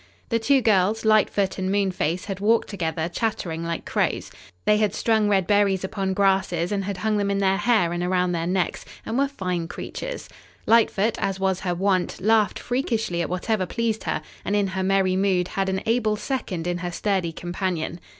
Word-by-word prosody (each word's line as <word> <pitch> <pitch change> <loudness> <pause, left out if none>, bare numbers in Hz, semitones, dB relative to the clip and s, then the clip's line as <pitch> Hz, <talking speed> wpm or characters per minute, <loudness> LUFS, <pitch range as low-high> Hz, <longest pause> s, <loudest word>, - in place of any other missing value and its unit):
The 230 - +1
two 270 +4 +3
girls, 210 +1 +2
Lightfoot 205 -3 +2
and 190 0 -1
Moonface, 185 -4 0
had 195 -2 -5
walked 225 +3 +2
together, 165 -4 -2
chattering 175 -4 -2
like 170 0 -4
crows. - - -1 0.3
They 210 - +4
had 210 -1 +1
strung 220 -2 +2
red 195 -3 +3
berries 200 -1 +2
upon 190 0 -2
grasses 190 -3 +1
and 200 -2 -1
had 200 -1 -3
hung 215 +1 0
them 200 -1 0
in 200 - 0
their 195 -1 +2
hair 210 -5 +2
and 175 - -2
around 180 0 +1
their 170 -1 -1
necks, 185 0 -1 0.2
and 225 - -3
were 275 +2 +3
fine 180 -10 -3
creatures. - - -6 0.4
Lightfoot, 225 -1 +3
as 195 -1 -1
was 190 -1 +1
her 180 -2 -2
wont, 185 0 0
laughed 215 +2 +3
freakishly 230 -8 -1
at 170 - -2
whatever 185 +2 -1
pleased 230 0 -2
her, 155 - -2 0.2
and 205 - -1
in 200 -2 +1
her 190 0 -3
merry 190 -1 +2
mood 185 -2 +1
had 195 0 -1
an 190 0 -2
able 225 -2 +1
second 210 -8 -3
in 175 0 -1
her 175 0 -3
sturdy 185 -2 -1
companion. 175 -1 -3
195 Hz, 190 wpm, -24 LUFS, 180-215 Hz, 0.4 s, They